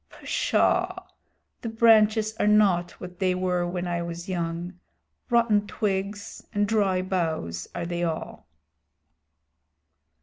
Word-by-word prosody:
Psshaw! 365 +1 0 0.6
The 230 - -4
branches 220 -1 +4
are - - +2
not 195 -5 +4
what 180 0 -9
they 185 -2 +1
were 180 -1 0
when 175 0 -3
I 170 -1 -1
was 170 +1 -6
young. 175 0 -4 0.5
Rotten 230 -4 +3
twigs 200 0 -3
and 205 0 +2
dry 200 -4 +1
boughs 160 - -2
are - - -3
they 175 0 -3
all." 165 -2 -4
185 Hz, 115 wpm, -26 LUFS, 175-210 Hz, 0.6 s, branches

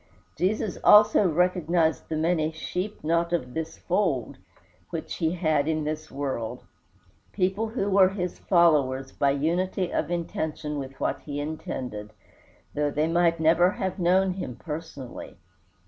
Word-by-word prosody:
Jesus 190 +4 -1
always 210 +1 +7
recognized 175 -2 +2
the 160 - -1
many 160 0 +1
"sheep 180 +5 -5
not 170 +2 +1
of 125 -8 -2
this 160 0 -4
fold" 175 - -1 0.5
which 160 -1 -5
he 165 -1 0
had 155 -5 +1
in 155 -1 0
this 155 +1 -4
world 135 -5 -4 0.7
people 195 +3 0
who 215 -3 -2
were 195 -2 +5
his 180 -2 -4
followers 140 -7 +3
by 140 - +1
unity 175 +6 0
of - - -1
intention 160 -3 -3
with 135 0 -8
what - - -1
he 145 -1 -6
intended, 125 -8 -5 0.6
though 150 0 0
they 150 +2 0
might 170 0 +2
never 165 +3 +4
have 190 -3 -3
known 185 +2 +3
him 180 -10 -5
personally. 150 -5 -8
165 Hz, 140 wpm, -26 LUFS, 150-180 Hz, 0.7 s, always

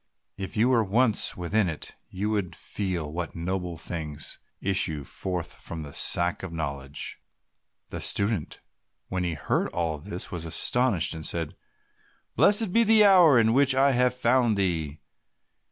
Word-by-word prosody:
If 95 +2 -6
you 115 +4 +3
were 120 -3 +3
once 110 +3 +1
within 90 +2 0
it 80 - -6 0.2
you 100 +3 -3
would 95 -5 -2
feel 90 -7 -4
what 85 -2 -5
noble 90 0 -4
things 80 -2 -4 0.2
issue 85 -6 0
forth 90 +5 -4
from 80 -1 -6
the 70 -1 -9
Sack 85 0 +2
of 95 - -7
Knowledge." 70 -4 -5 0.7
The - - -6
student, 100 -5 -1 0.5
when 90 -1 -2
he 85 -2 -2
heard - - -1
all 80 -3 -3
this, 90 +3 -5
was 85 -2 -5
astonished, 95 +4 +2
and 80 -1 -7
said, 80 -1 -1 0.8
"Blessed 205 -2 +3
be 230 - +5
the 220 -1 +6
hour 180 -9 +6
in 110 0 +3
which 135 0 +4
I 135 +1 +4
have 125 -1 +2
found 120 -3 +2
thee! 80 -6 -2
95 Hz, 155 wpm, -26 LUFS, 80-120 Hz, 0.8 s, the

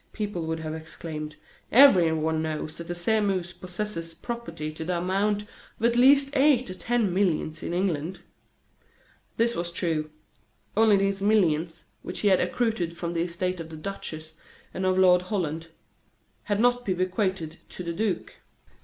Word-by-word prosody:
people 205 -6 -3
would 160 0 -2
have 155 -1 -4
exclaimed, 160 -1 -6 0.4
"everyone 160 - +5
knows 155 0 -3
that 170 - -8
the 175 - -3
Sairmeuse 190 -2 0
possesses 180 -1 -5
property 235 -10 -5
to 160 - -5
the 175 +2 -1
amount 200 +4 0
of 210 +2 -8
at 235 0 +3
least 275 +3 +5
eight 265 -5 +4
or - - -4
ten 225 -1 0
millions, 165 -5 0
in - - -4
England." 175 -1 -1 1.2
This 235 +1 +2
was 170 0 -3
true. 160 -3 -1 0.7
Only 215 -1 +5
these 195 0 0
millions, 175 -6 +1 0.2
which 180 - -6
had 195 -3 +4
accrued 180 -4 -1
from 170 -1 -3
the 165 - 0
estate 180 +1 -2
of 165 -1 -7
the 160 - -8
duchess 155 -3 -6 0.4
and 185 0 -1
of 185 0 +2
Lord 180 -1 +6
Holland, 165 -4 -3 0.8
had 205 -2 0
not 245 +1 +3
been 185 -5 -1
bequeathed 185 -3 -1
to 180 - -7
the 170 -1 -3
duke. 200 -1 -2
180 Hz, 155 wpm, -26 LUFS, 165-210 Hz, 1.2 s, Lord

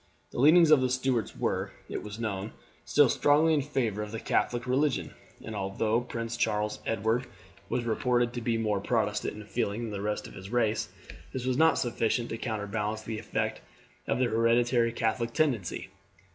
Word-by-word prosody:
The - - -5
leanings 155 +4 +7
of 150 -4 +7
the 130 - +1
Stuarts 130 -3 0
were, - - -1 0.2
it - - -4
was 105 0 -7
known, 105 -2 -3 0.3
still - - +5
strongly 155 +3 +4
in 150 - +3
favour 120 -7 -1
of 105 0 -5
the 110 - -4
Catholic 120 +2 0
religion, 135 +2 0 0.3
and 110 - -6
although 110 +4 0
Prince 115 -1 -4
Charles 105 -2 0
Edward 115 +4 0 0.4
was 125 - 0
reported 120 +1 +1
to 120 - -4
be 115 -1 0
more 105 -3 0
Protestant 105 -2 0
in 105 - -9
feelings 105 +2 -2
than 115 - -4
the 100 -1 -4
rest 105 +1 -2
of - - -10
his 95 +1 -9
race, 115 -2 +1 0.4
this 130 -1 -3
was 130 -1 +1
not 160 +4 +4
sufficient 120 -1 0
to 115 - -4
counterbalance 110 -1 -3
the 110 -1 -4
effect - - -2 0.5
of - - +1
the 130 - +2
hereditary 115 +1 +3
Catholic 115 0 -1
tendency. 125 - 0
115 Hz, 180 wpm, -29 LUFS, 105-125 Hz, 0.5 s, leanings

